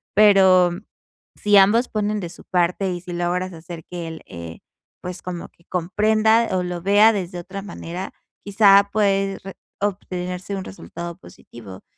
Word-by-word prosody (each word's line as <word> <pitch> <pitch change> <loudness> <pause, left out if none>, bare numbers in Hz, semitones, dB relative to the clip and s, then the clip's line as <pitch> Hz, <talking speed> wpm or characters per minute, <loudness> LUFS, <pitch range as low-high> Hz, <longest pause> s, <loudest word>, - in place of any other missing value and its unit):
Pero 190 -3 +6 0.6
si 205 -1 +3
ambos 215 +6 +5
ponen 210 0 -1
de 175 - -5
su 170 - -14
parte 180 +2 0
y 175 - -6
si 180 0 -9
logras 175 +2 -1
hacer 165 0 -9
que 175 -2 -6
él, 160 -1 -8
eh, 85 -1 -9 0.4
pues 180 0 -7
como 180 -2 -6
que 170 - -30
comprenda 215 +5 +2
o 180 - 0
lo 180 -1 -4
vea 205 +4 +5
desde 180 -3 -4
otra 195 +3 -7
manera, 185 -2 -7 0.3
quizá 200 -1 +5
puede 195 -2 +1 0.4
obtenerse 185 -1 -3
un 190 - -4
resultado 170 - -8
positivo. 105 - -13
185 Hz, 150 wpm, -22 LUFS, 175-200 Hz, 0.6 s, Pero